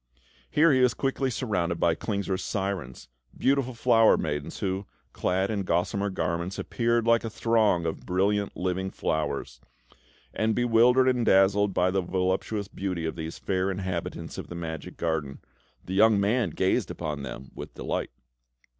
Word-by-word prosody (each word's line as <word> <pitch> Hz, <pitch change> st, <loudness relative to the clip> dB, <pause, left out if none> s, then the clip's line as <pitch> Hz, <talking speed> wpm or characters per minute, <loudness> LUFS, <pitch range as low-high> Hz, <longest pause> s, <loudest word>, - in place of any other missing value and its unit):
Here 155 Hz, 0 st, +4 dB
he 130 Hz, -, +3 dB
was 125 Hz, -5 st, +3 dB
quickly 135 Hz, +1 st, 0 dB
surrounded 90 Hz, -9 st, -1 dB
by 85 Hz, -, +3 dB
Klingsor's 100 Hz, 0 st, -2 dB
sirens, 95 Hz, -, -4 dB, 0.3 s
beautiful 130 Hz, -2 st, +1 dB
flower 115 Hz, -1 st, +5 dB
maidens, 75 Hz, -2 st, -3 dB
who, 95 Hz, 0 st, -2 dB, 0.3 s
clad 95 Hz, +3 st, 0 dB
in 105 Hz, -2 st, -1 dB
gossamer 95 Hz, +3 st, 0 dB
garments, 90 Hz, 0 st, -2 dB
appeared 115 Hz, -1 st, 0 dB
like 115 Hz, 0 st, +4 dB
a 115 Hz, -, -3 dB
throng 110 Hz, -6 st, +2 dB
of 80 Hz, -, -2 dB
brilliant 100 Hz, +2 st, 0 dB
living 95 Hz, +1 st, -1 dB
flowers; 75 Hz, -8 st, -3 dB, 0.7 s
and, 110 Hz, 0 st, 0 dB
bewildered 120 Hz, +2 st, +4 dB
and 125 Hz, -2 st, +2 dB
dazzled 100 Hz, 0 st, +4 dB
by 90 Hz, +1 st, +3 dB
the 95 Hz, 0 st, +1 dB
voluptuous 95 Hz, +3 st, -1 dB
beauty 90 Hz, -4 st, -3 dB
of 80 Hz, -, -3 dB
these 80 Hz, 0 st, -6 dB
fair 95 Hz, 0 st, -1 dB
inhabitants 95 Hz, -3 st, -4 dB
of -, -, -7 dB
the 85 Hz, -, -8 dB
magic 80 Hz, -2 st, -6 dB
garden, 80 Hz, -4 st, -2 dB, 0.5 s
the 95 Hz, -, -5 dB
young 105 Hz, +1 st, +5 dB
man 105 Hz, +1 st, +1 dB
gazed -, -, 0 dB
upon 75 Hz, -3 st, -4 dB
them 65 Hz, -1 st, -8 dB
with -, -, -9 dB
delight. -, -, -3 dB
95 Hz, 155 wpm, -27 LUFS, 85-115 Hz, 0.7 s, flower